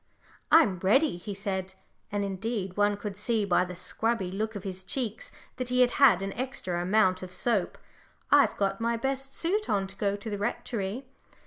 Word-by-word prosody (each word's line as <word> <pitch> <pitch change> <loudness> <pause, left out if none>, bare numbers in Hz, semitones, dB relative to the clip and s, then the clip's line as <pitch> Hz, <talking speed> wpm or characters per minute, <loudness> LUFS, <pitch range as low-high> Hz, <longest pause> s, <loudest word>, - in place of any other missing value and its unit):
"I'm 210 - +5
ready," 230 - +3
he 200 +3 -6
said, 190 -2 -3 0.4
and 205 0 -1
indeed 195 -1 -3
one 205 0 +2
could 205 -1 -5
see 215 +1 0
by 180 -2 +3
the 180 0 -7
scrubby 200 +1 -1
look 215 +3 -3
of 200 - -6
his 190 -1 -5
cheeks 225 +1 -3 0.3
that 255 -1 -3
he 250 0 +3
had 245 -1 +5
had 215 -9 +6
an 195 0 -3
extra 210 -8 -3
amount 185 0 +3
of 185 -1 -7
soap. 210 -3 0 0.5
"I've - - +5
got 195 +1 0
my 235 0 +1
best 270 +2 -3
suit 410 +6 -1
on 195 -2 +1
to 195 0 -8
go 200 0 0
to 205 +2 -7
the 205 - -3
Rectory." 210 +2 -3
205 Hz, 190 wpm, -28 LUFS, 190-235 Hz, 0.5 s, had